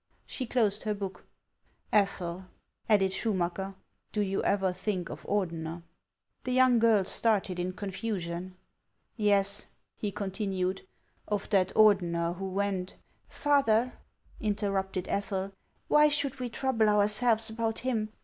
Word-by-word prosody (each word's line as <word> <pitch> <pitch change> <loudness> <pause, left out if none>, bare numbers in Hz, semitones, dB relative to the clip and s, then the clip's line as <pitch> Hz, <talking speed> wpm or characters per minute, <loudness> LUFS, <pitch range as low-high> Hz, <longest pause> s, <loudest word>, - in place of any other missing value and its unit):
" - - -39
She 255 - -4
closed 215 -4 +1
her 215 -1 -1
book. 195 -2 -7 0.3
" - - -53 0.3
Ethel," 190 -3 0 0.4
added 195 -3 +4
Schumacker, 190 -2 -1 0.2
" - - -48
do 210 - +1
you 195 -1 0
ever 190 -2 +1
think 185 -1 -3
of - - -9
Ordener? 170 -4 -2 0.3
" - - -51
The 255 - -3
young 255 -2 +5
girl 225 -3 +4
started 200 -4 +2
in 180 +1 -2
confusion. 185 -3 -4 0.3
" - - -50 0.2
Yes," 200 -2 +1 0.3
he 210 - -3
continued, 190 -2 -3 0.2
" - - -40
of 200 - -8
that 190 -3 +4
Ordener 175 -5 +3
who 190 +1 -5
went 190 -1 -2 0.2
— - - -42
"Father," 255 -5 +2 0.5
interrupted 195 -3 -1
Ethel, 195 -1 -2 0.4
"why 300 0 +6
should 285 -3 0
we 250 -1 -3
trouble 230 -3 +1
ourselves 215 +2 +3
about 225 0 -2
him 220 -4 0
200 Hz, 145 wpm, -29 LUFS, 190-220 Hz, 0.5 s, why